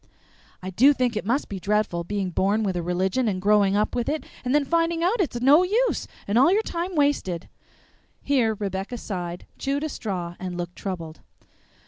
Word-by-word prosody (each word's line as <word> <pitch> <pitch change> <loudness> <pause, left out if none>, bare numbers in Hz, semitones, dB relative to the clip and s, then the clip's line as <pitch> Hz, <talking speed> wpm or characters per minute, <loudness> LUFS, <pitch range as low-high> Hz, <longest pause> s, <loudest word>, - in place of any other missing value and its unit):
"I 185 - -4
do 265 +10 +6
think 250 -4 0
it 210 - -3
must 260 +6 +1
be 195 - -5
dreadful, 205 -3 0
being 195 0 -2
born 200 +5 +1
with 190 -3 -1
a 175 - -1
religion 185 +8 0
and 190 -3 0
growing 200 0 +3
up 210 +1 +1
with 240 +1 -1
it, 310 +1 -2 0.2
and 255 +2 +1
then 295 -1 +3
finding 335 +2 +1
out 400 +5 +2
it's 280 -9 -1
no 280 +7 +6
use 440 +7 +1 0.2
and 205 +4 +3
all 275 +7 +6
your 425 +3 +3
time 350 0 -3
wasted!" 285 - 0 0.8
Here 245 -6 +2
Rebecca 195 +3 -4
sighed, 180 -5 -5
chewed 280 +2 -1
a 310 - -2
straw, 180 -9 -4
and 180 -1 -5
looked 175 0 -5
troubled. 170 -5 -6
215 Hz, 190 wpm, -25 LUFS, 185-285 Hz, 0.8 s, do